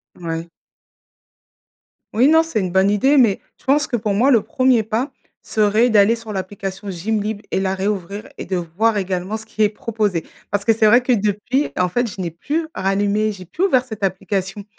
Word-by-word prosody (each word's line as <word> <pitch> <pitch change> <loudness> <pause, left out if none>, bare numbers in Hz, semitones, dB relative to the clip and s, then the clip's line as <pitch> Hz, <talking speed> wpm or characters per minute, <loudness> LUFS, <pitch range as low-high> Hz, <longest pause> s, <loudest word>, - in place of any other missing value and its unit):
Ouais. 165 -1 -5 1.7
Oui 240 +5 +4
non, 320 +2 +5
c'est 325 -9 -2
une 185 -2 -1
bonne 190 +2 +3
idée, 265 +8 +3
mais 230 -7 +4 0.2
je - - -26
pense 290 +2 +3
que, 255 - -1
pour 210 -2 -1
moi, 235 +7 +3
le 230 -7 +4
premier 250 +1 +2
pas 230 +6 -2 0.3
serait 215 +3 +2
d'aller 215 0 +5
sur 225 -2 -9
l'application 195 0 -5
Gymlib 210 +3 -2
et - - 0
la 190 0 0
réouvrir, 200 +3 -3
et - - -6
de 185 - -2
voir 185 +6 0
également 190 +1 -2
ce 220 0 -8
qui 220 -1 0
est 210 - +4
proposé. 210 -5 -2 0.3
Parce 205 0 0
que 225 - +4
c'est 220 0 +2
vrai 235 +4 +6
que 250 +1 -1
depuis, 215 +6 0
en 180 0 +2
fait, 240 +6 0
je 190 - -7
n'ai 175 - -2
plus 295 - -3
rallumé 205 +2 +1
j'ai 185 -3 -10
plus 320 - -3
ouvert 265 -10 +3
cette 220 -5 -9
application, 195 +1 -2
210 Hz, 200 wpm, -20 LUFS, 195-230 Hz, 1.7 s, vrai